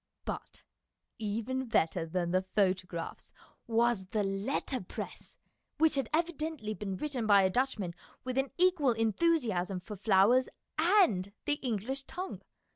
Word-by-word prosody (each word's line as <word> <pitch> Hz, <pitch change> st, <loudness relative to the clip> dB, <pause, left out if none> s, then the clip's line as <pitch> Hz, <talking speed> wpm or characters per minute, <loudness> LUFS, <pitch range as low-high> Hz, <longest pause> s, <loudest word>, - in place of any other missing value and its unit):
But -, -, -6 dB, 0.6 s
even 230 Hz, +5 st, -2 dB
better 165 Hz, -5 st, +1 dB
than 175 Hz, +1 st, -1 dB
the 185 Hz, +1 st, +3 dB
photographs 185 Hz, -3 st, -1 dB, 0.4 s
was 230 Hz, -4 st, +2 dB
the 210 Hz, +2 st, 0 dB
letterpress, 195 Hz, +2 st, -3 dB, 0.4 s
which 320 Hz, 0 st, +4 dB
had 275 Hz, -5 st, -1 dB
evidently 315 Hz, -8 st, -1 dB
been 195 Hz, -3 st, -4 dB
written 265 Hz, -5 st, -2 dB
by 200 Hz, -2 st, +7 dB
a 190 Hz, -, +3 dB
Dutchman 225 Hz, -7 st, 0 dB, 0.3 s
with 255 Hz, +1 st, -1 dB
an 270 Hz, 0 st, 0 dB
equal 350 Hz, -8 st, +4 dB
enthusiasm 225 Hz, -, +1 dB
for 210 Hz, +4 st, -8 dB
flowers 215 Hz, +5 st, +4 dB, 0.3 s
and 315 Hz, -, +4 dB
the 290 Hz, -1 st, +1 dB
English 255 Hz, +3 st, -2 dB
tongue. 370 Hz, +1 st, -6 dB
225 Hz, 125 wpm, -31 LUFS, 190-275 Hz, 0.6 s, by